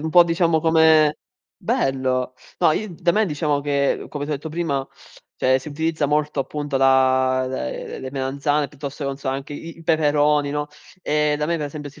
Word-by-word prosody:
un 160 +1 -3
po' 175 +1 +7
diciamo 165 -1 +2
come 160 -2 +4 0.4
bello. 130 - -1 0.2
No, 155 - +4
i 195 0 -3
da 170 0 +1
me, 215 +3 +3
diciamo 150 -2 0
che, 140 -1 0
come 145 -1 -4
ti - - -5
ho - - +1
detto 145 +3 -6
prima, 150 -5 -2 0.5
cioè, 130 0 +3
si 130 - -9
utilizza 160 +1 -1
molto 150 0 0
appunto 145 0 -3
la 130 -1 +3
le 130 - -5
le 130 - -6
melanzane, 140 +2 -1
piuttosto 145 +1 -7
che, - - -1
non 135 - -4
so, 135 - -5
anche 135 +2 -4
i 165 +3 -9
i - - -12
peperoni, 150 -2 +2
no, 150 0 -2 0.4
e 150 -1 +1
da 150 - -1
me 170 +1 0
per 150 -2 -3
esempio 145 0 -7
si 150 - -18
145 Hz, 200 wpm, -22 LUFS, 135-160 Hz, 0.5 s, po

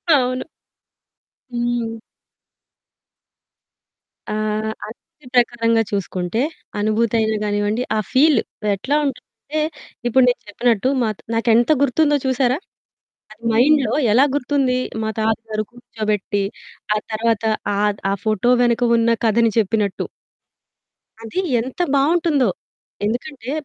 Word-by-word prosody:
అవును. 255 -1 0 1.1
హ్మ్. 240 -1 -1 2.4
ఆహ్, 215 0 -1
ఆ - - -7
స్తితి 300 -4 -26
ప్రకారంగా 230 -2 +3
చూసుకుంటే 195 +2 -2 0.4
అనుభూతి 215 +2 +1
అయిన 220 0 +1
గానివ్వండి, 205 +3 0
ఆహ్, 215 - -1
ఫీల్ 280 -1 +5 0.4
ఎట్లా 270 +9 -1
ఉంటుందంటే 280 +3 -4 0.5
ఇప్పుడు 255 +2 +4
నేను 245 - +1
చెప్పినట్టు 235 +2 +1
మాకు 215 -3 -2
నాకెంత 230 +3 +3
గుర్తుందో 295 +2 +3
చూసారా? 260 +1 +2 0.7
అది 215 +2 -16
మైండ్‌లో 275 +5 +4 0.2
ఎలా 255 +5 +6
గుర్తుంది? 265 -2 +1 0.2
మా 220 - -1
తాతగారు 220 0 -1
కూర్చోబెట్టి, 215 -4 -2 0.5
ఆ - - +2
తర్వాత 225 0 0 0.3
ఆహ్, 205 0 +1
ఆ - - +2
ఫోటో 215 +2 +2
వెనక 240 0 +2
ఉన్న 230 0 +2 0.2
కథని 230 +1 +4
చెప్పినట్టు 210 -1 0 1.2
అది 225 +12 -2 0.2
ఎంత 260 +8 -7
బాగుంటుందో. 295 -2 +3 0.6
ఎందుకంటే 250 +3 -3
230 Hz, 105 wpm, -20 LUFS, 215-255 Hz, 2.4 s, ఎలా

